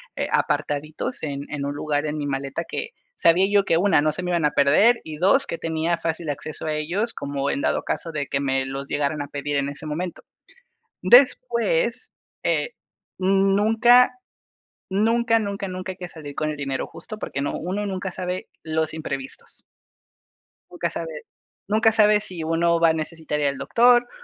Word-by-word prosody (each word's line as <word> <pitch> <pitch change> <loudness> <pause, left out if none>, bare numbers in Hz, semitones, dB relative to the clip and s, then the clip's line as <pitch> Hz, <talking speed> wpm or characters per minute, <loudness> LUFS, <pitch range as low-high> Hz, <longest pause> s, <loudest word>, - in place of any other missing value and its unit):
eh, - - -2
apartaditos 155 - -1
en 140 -2 -3
en 145 -1 -3
un 140 - -2
lugar 145 0 -1
en 150 +1 -3
mi 145 - -3
maleta 140 +3 -3
que 465 - -5 0.2
sabía 175 +3 +4
yo 205 -1 +4
que, 165 - +2
1, 180 -3 +4
no 155 0 +1
se 180 - -5
me 180 - -2
iban 170 -3 +1
a 150 - +3
perder 175 +13 +5
y 155 -1 -7
2, 195 - +3
que - - -4
tenía 165 +1 -1
fácil 165 -1 -3
acceso 145 +2 -5
a 155 - -1
ellos, 175 +10 -2
como 140 0 -3
en - - -1
dado - - 0
caso 165 - -3
de 145 -2 -2
que 135 - -1
me 135 -1 0
los 135 +1 -5
llegaran 145 +1 -1
a 145 - -5
pedir 145 0 -2
en 140 0 0
ese 145 +2 -7
momento. 165 +4 -4 0.8
Después, - - +3 0.3
eh, - - +1 0.5
nunca, 210 +6 +4 0.8
nunca, 230 +3 +2
nunca, 200 -2 -3
nunca 185 0 -5
hay - - -22
que 180 - -6
salir 150 -4 -10
con 155 0 -1
el 150 - -5
dinero 135 -2 -2
justo, 215 - -9
porque 140 - -4
no 145 - -2
uno 190 +5 -3
nunca 190 -1 -3
sabe 180 0 -4 0.2
los 160 0 -1
imprevistos. 135 -4 -7 1.1
Nunca 175 -1 -2
sabe 165 -2 -6 0.5
nunca 220 +1 +4
sabe, 210 -1 +5
si 180 -5 -7
uno 165 +1 +2
va 165 - +6
a - - +4
necesitar 160 -1 -4
allá 145 -1 +2
al 140 - -7
doctor. 240 +1 +4
165 Hz, 185 wpm, -23 LUFS, 145-195 Hz, 1.1 s, va